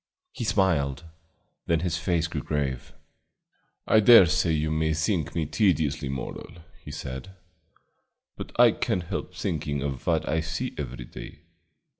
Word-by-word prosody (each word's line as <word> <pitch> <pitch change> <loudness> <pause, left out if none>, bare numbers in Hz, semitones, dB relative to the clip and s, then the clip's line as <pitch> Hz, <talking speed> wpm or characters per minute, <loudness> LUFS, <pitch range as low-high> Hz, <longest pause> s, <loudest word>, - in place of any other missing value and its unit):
He - - -5
smiled, 80 -10 +1 0.6
then 85 -2 +2
his 85 -2 -1
face 85 -1 0
grew 80 -3 -4
grave. 70 -1 -3 1.0
"I 110 - +5
dare 110 -2 +9
say 80 +1 +1
you 75 0 0
may 80 0 +1
think 80 -1 -1
me 80 -2 0
tediously 80 -7 +1
moral," 65 -2 -6 0.3
he - - -9
said, 75 +5 -7 1.0
"but - - -8
I - - +8
can't 90 - -1
help 85 - -5
thinking 75 -3 -2
of 70 -3 -5
what - - +1
I 80 +4 +1
see 85 +11 -3
every 65 -4 -6
day. - - -11
80 Hz, 145 wpm, -26 LUFS, 70-85 Hz, 1.0 s, dare